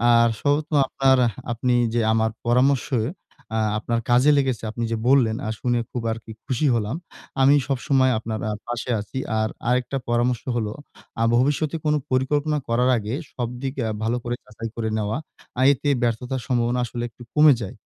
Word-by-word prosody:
আর 115 0 +5
সর্বত্র 150 +2 0
আপনার 135 -1 +3 0.3
আপনি 125 +1 0 0.2
যে 120 - +2
আমার 110 0 +2 0.2
পরামর্শে 125 +1 +2 0.6
আ - - +2 0.2
আপনার 115 +1 -1
কাজে 125 +5 +5
লেগেছে, 130 -5 0
আপনি 120 +1 -4
যে 115 - 0
বললেন 125 -5 +4
আ - - -1
শুনে 120 -1 +1
খুব 120 - -3
আরকি 110 0 -7
খুশি 140 +2 0
হলাম। 110 +3 -1 0.5
আমি 135 +2 +6
সবসময় 130 -1 +2
আপনার 110 0 -4
আ - - -1 0.2
পাশে 120 +1 -3
আছি। 105 +5 -8 0.2
আর 110 0 +1 0.2
আরেকটা 125 +2 0
পরামর্শ 120 0 +1
হল 115 -3 0 0.5
আ - - +4
ভবিষ্যতে 145 +5 +1
কোন 150 - +3 0.2
পরিকল্পনা 145 +4 +1
করার 125 +2 +2
আগে 110 +1 -4 0.2
সবদিক 125 +2 -4
আ - - -1
ভালো 115 +2 +1
করে 120 0 -2
যাচাই 115 +2 -7
করে 110 -1 -2
নেওয়া। 105 +2 -1 0.4
আ - - +2
এতে 145 +2 -2
ব্যর্থতার 125 +2 -1
সম্ভাবনা 120 -1 +1
আসলে 120 0 -5
একটু 120 - -14
কমে 150 -1 +7
যায়। 95 - -6
125 Hz, 170 wpm, -23 LUFS, 115-135 Hz, 0.6 s, কমে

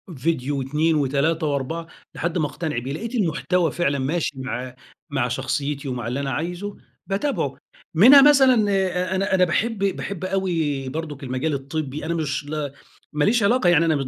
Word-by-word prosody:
فيديو 145 -1 -1
و2 150 +5 +1
و3 150 +3 +1
و4 145 +4 -2 0.3
لحد 170 +1 -2
ما 155 - +1
أقتنع 155 -1 -4
بيه. 130 +4 -3
لقيت 230 - -5
المحتوى 170 - +1
فعلًا 140 -5 0
ماشي 155 +5 -1
مع 125 -1 -5 0.3
مع 135 -4 0
شخصيتي 140 +3 -2
ومع 120 -3 -3
اللي 125 +4 -2
أنا 140 -1 -2
عايزه، 180 +8 -4 0.3
باتابعه. 205 +9 -1 0.4
منها 260 - +9
مثلًا 260 -6 +5
أ 185 -1 0
أنا 190 0 +1
أنا 185 - +4
باحب 225 +6 0
باحب 195 -1 -2
أوي 165 -8 -1
برضُك 150 -1 -6
المجال 130 +4 -2
الطبّي. 140 +1 -4
أنا 170 - -1
مش 145 -3 -2
ل 150 -3 -3 0.4
ماليش 205 +11 +2
علاقة 200 -3 +3
يعني 165 -1 +4
أنا 160 -2 +2
من 135 -2 -2
160 Hz, 165 wpm, -23 LUFS, 140-185 Hz, 0.4 s, منها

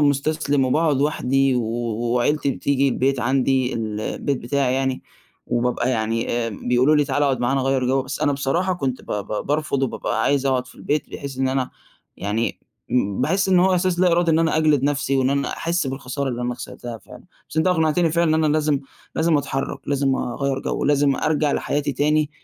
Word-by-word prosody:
مُستسلِم 145 -1 +1
وباقعُد 150 +3 +2
لوحدي 135 -2 +1
و 125 - +1
و 120 +1 -2
وعيلتي 140 +3 +1
بتيجي 140 +1 +1
البيت 135 0 0
عندي 130 0 +1
ال 110 -2 -3
البيت 135 +4 -2
بتاعي 130 +1 0
يعني 130 -1 -1 0.4
وبابقى 120 +1 0
يعني 115 -1 -1
آآ 120 -1 0
بيقولوا 125 +7 +2
لي: 150 - +3
"تعالَ 145 - -1
أقعد 135 -4 +1
معانا 135 +3 +1
غيّر 135 -1 +1
جَو." 135 +1 +2
بس 135 +2 -6
أنا 150 -2 +2
بصراحة 145 +7 0
كنت 135 -6 -3
ب - - -19
ب 105 0 -3
بارفض 145 -2 0
وبابقى 115 -3 -1
عايز 140 +1 +1
أقعُد 130 -2 +1
في - - -15
البيت 150 0 -2
بحيث 140 -2 -7
إن 135 0 +1
أنا 130 -1 -1 0.5
يعني 105 +4 -2 0.3
م 100 -6 0
باحِس 190 +9 +1
إن 185 -1 +5
هو 190 +1 +4
إحساس 180 -1 +1
لا 180 -2 +4
إرادي 170 0 +3
إن 160 - +3
أنا 165 -1 +2
أجلِد 155 -4 +3
نَفسي، 140 -1 +1
وإن 130 0 +2
أنا 140 0 0
أحِس 170 -2 -1
بالخسارة 135 +1 -3
اللي 125 -1 -3
أنا 125 0 -2
خسرتها 120 -1 -8
فعلًا. - - -14 0.3
بس - - -10
أنت 160 - +2
أقنعتني 165 -1 +2
فعلًا 165 -1 +2
إن 160 - +2
أنا 150 - +2
لازم 150 -2 +1 0.4
لازم 160 0 +3
أتحرّك، 135 -1 -3
لازم 140 -1 +1
أغيَّر 135 +2 -2
جَو، - - -2
لازم 145 -1 +3
أرجع 150 -1 +1
لحياتي 145 0 -1
تاني، 150 +2 +1
135 Hz, 200 wpm, -22 LUFS, 125-150 Hz, 0.5 s, إن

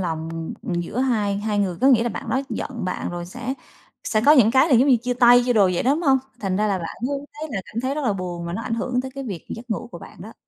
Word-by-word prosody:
lòng 165 -1 -4
giữa 175 +6 -3
hai 215 -6 +1
hai 210 0 -1
người, 185 -4 0
có 260 - +4
nghĩa 245 -4 +5
là 240 - 0
bạn 225 - -6
đó 265 - +1
giận 235 -7 -4
bạn 180 - -3
rồi 175 0 -5
sẽ 250 +7 -5 0.5
sẽ 215 - +1
có 300 - +9
những 240 -7 +6
cái 265 +6 +4
là 265 - +4
giống 260 +5 +5
như 255 - +6
chia 245 +2 -2
tay, 245 0 +6
chia 245 - +2
đồ 210 -4 +5
vậy - - 0
đó, 260 - +2
đúng 330 - -3
hông? 270 -3 +4 0.2
Thành 190 -2 -1
ra 215 +1 +1
là 195 -2 0
bạn 165 - -6
hướng 280 0 -2
thấy 305 +1 -7
là 195 - -2
cảm 225 - -5
thấy 260 +2 -1
rất 300 -2 -3
là 215 - +2
buồn 175 -2 -5
và 170 - -4
nó 225 - -4
ảnh 230 - -2
hưởng 250 +2 -1
tới 260 +1 -6
cái 275 -1 -5
việc 190 -9 -6
giấc 235 +1 -8
ngủ 235 +3 -3
của - - -7
bạn - - -13
đó. - - -10
230 Hz, 305 wpm, -22 LUFS, 190-260 Hz, 0.5 s, có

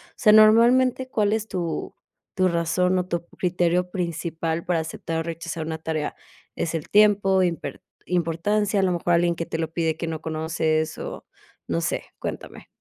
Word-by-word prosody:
sea, 215 - +4
normalmente, 235 +4 +5
¿cuál 210 -3 +1
es 220 0 -1
tu 170 -6 -3 0.4
tu 185 -1 +3
razón 180 +2 +1
o 180 - 0
tu 170 -1 -1
p 170 - -30
criterio 180 0 +1
principal 165 -2 -3
para 175 -2 +1
aceptar 160 +1 -4
o 165 - -1
rechazar 165 -1 -5
una 160 0 -3
tarea? 160 -1 -3 0.4
¿Es 165 - -2
el 160 -2 -4
tiempo, 200 -2 +4
imper 165 -6 -3 0.2
importancia, 185 +5 0
a - - +1
lo 185 - +2
mejor 175 0 0
alguien 170 0 +3
que 165 0 -4
te - - -4
lo 160 -1 -2
pide 160 -1 -1
que 165 - -4
no 160 -1 -3
conoces?, 160 0 -1
o - - -7 0.4
no 85 0 0
sé. - - -1 0.2
Cuéntame. - - -7
170 Hz, 180 wpm, -24 LUFS, 160-190 Hz, 0.4 s, normalmente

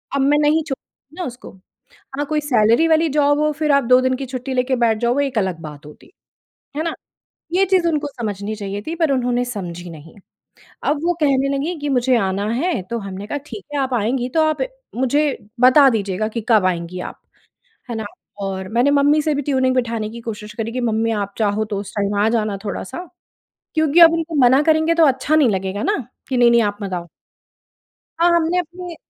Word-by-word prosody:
अब 275 - +1
मैं 290 +2 +3
नहीं 305 +2 +3
छोड़ 280 -4 -4 0.4
ना - - -2
उसको। 245 -3 -9 0.7
हाँ, 290 - -1
कोई 305 +1 0
सैलरी 245 +1 +3
वाली 320 0 +3
जॉब 290 0 +2
हो, 305 0 +2
फिर 300 0 0
आप 280 -2 +3
2 250 +1 +5
दिन 260 0 +1
की 270 +1 -5
छुट्टी 260 +1 -5
लेके 255 +1 +1
बैठ 230 -3 +2
जाओ 235 +2 +1
वो 285 - +1
एक 275 -4 -1
अलग 190 -4 -1
बात 150 -1 -10
होती। 150 - -16 0.6
है 310 - -1
ना? 335 - -2 0.6
ये 385 +2 +4
चीज़ 365 -2 +2
उनको 300 -2 0
समझनी 215 -5 -5
चाहिए 200 -1 -5
थी 330 - -3
पर 320 -3 +1
उन्होंने 245 -2 +1
समझी 180 -7 -6
नहीं। 160 -1 -12 0.7
अब 290 0 +1
वो 350 - +2
कहने 275 -2 +2
लगी 320 +6 -2
कि 290 0 -3
मुझे 255 -1 +2
आना 195 -1 -1
है, 275 - -1
तो 235 +6 -5
हमने 195 0 -7
कहा 290 - -3
ठीक 395 - -9
है 290 - -1
आप 265 -2 -1
आएँगी 245 +3 0
तो - - +5
आप 310 - -2 0.3
मुझे 280 +4 +1 0.2
बता 265 +2 +7
दीजिएगा 210 -2 -1
कि 230 +1 -4
कब 215 -5 +4
आएँगी 180 0 -2
आप। - - -7 0.7
है 235 - -3
ना, 220 -1 -4 0.4
और 190 -1 -4
मैंने 240 +5 +2
मम्मी 290 +2 +4
से 310 0 0
भी 285 - -1
ट्यूनिंग 260 -2 +1
बिठाने 230 -4 -1
की 235 +1 -9
कोशिश 210 -2 -7
करी 230 -1 -3
कि 255 - -3
मम्मी 225 -1 0
आप 200 -2 -3
चाहो 215 0 0
तो 205 -2 -4
उस 200 - -8
टाइम 205 0 -1
आ 210 - +3
जाना 215 -3 -1
थोड़ा-सा। 275 - -5 0.7
क्योंकि 315 +1 +3
अब 330 -1 +9
उनको 330 0 -2
मना 260 +4 +5
करेंगे 315 +1 +3
तो 335 -1 +5
अच्छा 270 +3 +1
नहीं 295 -5 +4
लगेगा 190 0 -2
ना, - - +1 0.3
कि 260 - -1
नहीं-नहीं 235 -1 +5
आप 205 -1 -2
मत 195 -1 -5
आओ। 175 -1 -5 1.1
हाँ, 345 - +5
हमने 340 +2 +1
अपने 355 0 -7
250 Hz, 210 wpm, -20 LUFS, 210-295 Hz, 1.1 s, अब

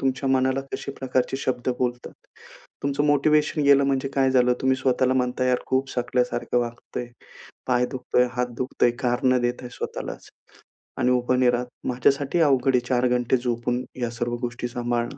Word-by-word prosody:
तुमच्या 135 0 -1
मनाला 130 0 +2
कशा 140 - -4
प्रकारचे 130 0 -1
शब्द 130 -2 -2
बोलतात. 125 -1 -2 0.7
तुमचं 140 +1 0
मोटिव्हेशन 150 +1 +2
गेलं 140 0 +5
म्हणजे 135 0 0
काय 135 -1 +3
झालं, 125 -1 +4
तुम्ही 130 0 +2
स्वतःला 130 0 +1
म्हणताय 125 0 0
यार 125 - +2
खूप 130 +1 0
थकल्यासारखं 125 0 0
वाटतंय, 120 +1 -4 0.6
पाय 125 -1 +2
दुखतोय, 125 -1 +1
हात 125 0 0
दुखतय, 125 -1 +1
कारण 130 0 +2
देताय 120 0 -2
स्वतःलाच - - -6 0.7
आणि 125 - +2
उभा 125 0 +2
नाही 125 -1 +4
राहत. 125 0 -1 0.2
माझ्यासाठीही 140 +6 +2
अवघड 135 -2 +3
आहे 125 - +5
4 125 -1 +2
घंटे 125 +1 +1
झोपून 120 0 -2 0.2
या 120 - 0
सर्व 120 0 -3
गोष्टी 120 0 -3
सांभाळणं 120 -1 -2
125 Hz, 160 wpm, -24 LUFS, 125-135 Hz, 0.7 s, गेलं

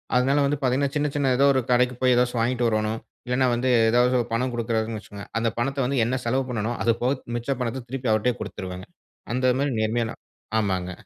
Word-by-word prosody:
அதனால 130 +3 +3
வந்து 145 +1 0
பார்த்தீங்கன்னா 135 +2 +1
சின்ன 150 0 +1
சின்ன 140 -2 +2
ஏதாவது 140 +2 +5
ஒரு 130 - +2
கடைக்கு 125 +1 +3
போய் 130 -1 +4
ஏதாசும் 125 -1 +1
வாங்கிட்டு 120 0 +1
வரோணும். 110 0 0 0.3
இல்லன்னா 125 +1 +2
வந்து 120 +2 0 0.2
ஏதாவது 125 +2 +3 0.2
பணம் 125 +2 0
குடுக்குறாங்கனு 115 -1 -1
வச்சுக்கோங்க. 100 -1 -10
அந்த 115 0 +1
பணத்த 135 +4 -1
வந்து 135 +2 -1
என்ன 120 +3 0
செலவு 130 +3 +1
பண்ணனும்? 115 0 -2
அது 115 +3 +3
போக 125 +2 +2 0.2
மிச்ச 120 +2 -4
பணத்த 125 +1 -3
திருப்பி 130 0 -4
அவர்ட்டயே 110 +3 +2
குடுத்துருவேங்க. 95 -2 -6 0.5
அந்த 130 +1 +2
மாரி 140 +1 0
நேர்மையா 110 +2 +1 0.5
ஆமாங்க. 95 -3 -1
125 Hz, 190 wpm, -24 LUFS, 115-130 Hz, 0.5 s, ஏதாவது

